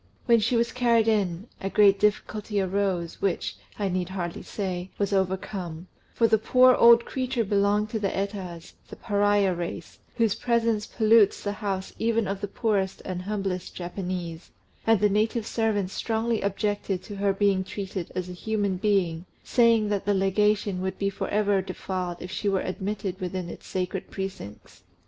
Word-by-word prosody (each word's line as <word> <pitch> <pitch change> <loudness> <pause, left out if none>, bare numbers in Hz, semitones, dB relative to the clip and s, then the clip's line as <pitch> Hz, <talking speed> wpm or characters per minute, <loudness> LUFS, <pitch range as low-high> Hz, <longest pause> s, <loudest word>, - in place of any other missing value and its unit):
When 235 -2 +5
she 235 +3 +1
was 235 0 +2
carried 235 -3 +3
in, 200 -4 +1 0.2
a 195 - -2
great 200 -1 +5
difficulty 210 0 0
arose, 190 -3 -1
which, 195 -3 -1 0.2
I 205 - 0
need 180 -1 -1
hardly 175 -3 -4
say, 185 -3 -4
was 200 0 0
overcome; 185 -2 -2 0.3
for 230 - +3
the 220 -1 +3
poor 255 +3 +6
old 235 -1 +7
creature 255 -2 -1
belonged 205 +1 +1
to 220 - -1
the 200 -2 0
Etas, 190 -4 -5 0.2
the - - -8
Pariah 205 -2 +2
race, 170 -1 -6 0.2
whose 225 -4 +2
presence 230 -2 0
pollutes 220 -2 +4
the 205 - -1
house 200 -2 -4
even 225 -2 +1
of 195 0 -3
the 205 - -2
poorest 200 -2 -1
and 180 -1 -4
humblest 195 -2 -3
Japanese; 175 -2 -5 0.4
and 225 -2 +4
the 210 - +5
native 215 +2 0
servants 210 -5 0
strongly 225 0 -1
objected 200 -2 -1
to 205 +1 -8
her 200 0 +2
being 195 -1 +2
treated 190 -2 -5
as 185 -1 -2
a 180 - -7
human 200 0 -1
being, 180 -4 0 0.2
saying 230 -4 +3
that 205 -2 -1
the 205 0 +2
Legation 200 0 +1
would 190 0 -3
be 200 0 0
for - - -4
ever 205 -2 +2
defiled 185 -2 -4
if 180 - -7
she 205 - -1
were 195 -1 +1
admitted 190 0 -4
within 180 -1 -3
its - - -10
sacred 185 0 -3
precincts. 190 - -7
200 Hz, 170 wpm, -26 LUFS, 185-215 Hz, 0.4 s, old